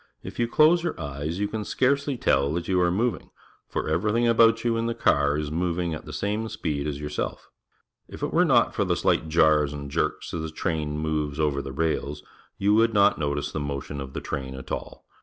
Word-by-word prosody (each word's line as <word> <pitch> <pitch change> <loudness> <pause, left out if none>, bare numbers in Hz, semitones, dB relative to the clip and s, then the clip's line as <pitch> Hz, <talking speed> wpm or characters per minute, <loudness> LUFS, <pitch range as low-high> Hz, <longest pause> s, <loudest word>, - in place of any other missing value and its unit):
If - - -8
you 120 - +2
close 155 +7 +5
your 170 - -3
eyes, 75 +2 -4
you 105 - +1
can 110 0 -4
scarcely 140 +4 +1
tell 70 - +2
that 85 0 -3
you 90 -1 +2
are 90 - +3
mo\'ing, 105 +2 -1 0.4
for - - -3
every 85 +7 +1
tliing 120 +2 +2
about 115 -1 +5
you 120 -1 +1
in 115 0 -1
the 115 - -2
car 70 -9 +2
is 75 -1 -3
moving 85 0 -1
at 75 - -7
the - - -8
same 105 +2 -2
speed 75 -6 -3
as 70 -1 -3
yourself. 75 0 -4 0.6
If - - -9
it - - -2
were - - +5
not - - +3
for - - +1
the - - +1
shght 80 - +1
jars 75 -2 +4
and 70 -1 -7
jerks - - -2
as 85 - -2
the 80 - -4
train 75 -2 -2
moves 75 -1 -2
over 75 -3 +1
the 70 - -7
rails, 75 0 -2 0.3
you 100 +1 +2
would 115 0 +3
not 100 -3 +4
notice 75 -1 -1
the - - -3
motion 70 0 -4
of 65 0 -8
the - - -4
train 65 -3 -5
at 65 - -9
all. - - -6
80 Hz, 225 wpm, -25 LUFS, 75-110 Hz, 0.6 s, close